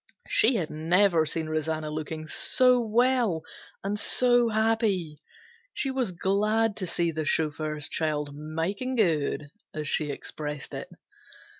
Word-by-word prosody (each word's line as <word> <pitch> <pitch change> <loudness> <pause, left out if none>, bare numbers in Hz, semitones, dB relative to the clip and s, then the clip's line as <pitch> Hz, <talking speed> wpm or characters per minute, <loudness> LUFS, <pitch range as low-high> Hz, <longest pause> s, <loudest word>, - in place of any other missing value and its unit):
She 240 +3 +5
had 175 -8 -2
never 165 +1 +3
seen 160 0 -1
Rosanna 155 0 -2
look 155 -1 -5 0.2
so 250 +9 +3
well 230 -6 +1 0.4
and 205 +2 -2
so 245 +2 +4
happy. 215 -8 0 0.5
She 270 - -1
was 255 -7 -1
glad 210 +4 0
to 185 - -3
see 170 0 0
the 155 0 -3
chauffeur's 150 -1 -1
child 150 -2 -1
"makin' 165 - -3
good" 155 - 0 0.3
as 155 -1 -3
she 150 0 +2
expressed 150 0 -6
it. - - -6
170 Hz, 130 wpm, -27 LUFS, 155-220 Hz, 0.5 s, She